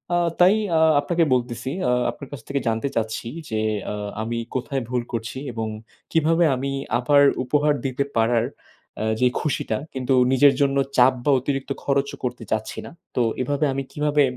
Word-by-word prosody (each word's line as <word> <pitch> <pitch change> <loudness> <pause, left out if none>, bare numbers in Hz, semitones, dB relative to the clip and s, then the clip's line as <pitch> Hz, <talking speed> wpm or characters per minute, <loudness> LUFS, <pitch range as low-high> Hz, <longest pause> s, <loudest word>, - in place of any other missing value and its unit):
আ - - +3 0.2
তাই 185 +4 +6 0.2
আ - - +3 0.2
আপনাকে 170 +3 +1
বলতেছি, 120 0 -2 0.2
আ - - +3 0.2
আপনার 140 - -10
কাছ 135 -5 -7
থেকে 140 0 -1
জানতে 115 +4 0
চাচ্ছি 110 0 -2 0.2
যে, 110 -1 -1 0.3
আ - - -3 0.3
আমি 115 +1 -3 0.2
কোথায় 130 +1 -2
ভুল 125 -1 0
করছি? 115 +2 -4 0.2
এবং 110 -1 -3 0.4
কিভাবে 165 +1 +3
আমি 135 +2 -3 0.3
আবার 140 +3 +4 0.2
উপহার 150 +3 +2
দিতে 135 +1 0
পারার 115 0 +3 0.5
এ্যা 110 0 0
যে 125 - +6
খুশিটা 125 -7 -1 0.2
কিন্তু 130 0 0 0.2
নিজের 140 +1 +6
জন্য 140 0 +2 0.2
চাপ 125 +1 +6
বা, 145 - +4
অতিরিক্ত 135 +1 -3
খরচও 140 0 0
করতে 125 -2 -3
চাচ্ছি 110 0 -2
না। - - -9 0.2
তো 125 - +2 0.2
এভাবে 145 +3 0
আমি 135 0 -2
কিভাবে 150 -1 +2
130 Hz, 170 wpm, -23 LUFS, 120-145 Hz, 0.5 s, তাই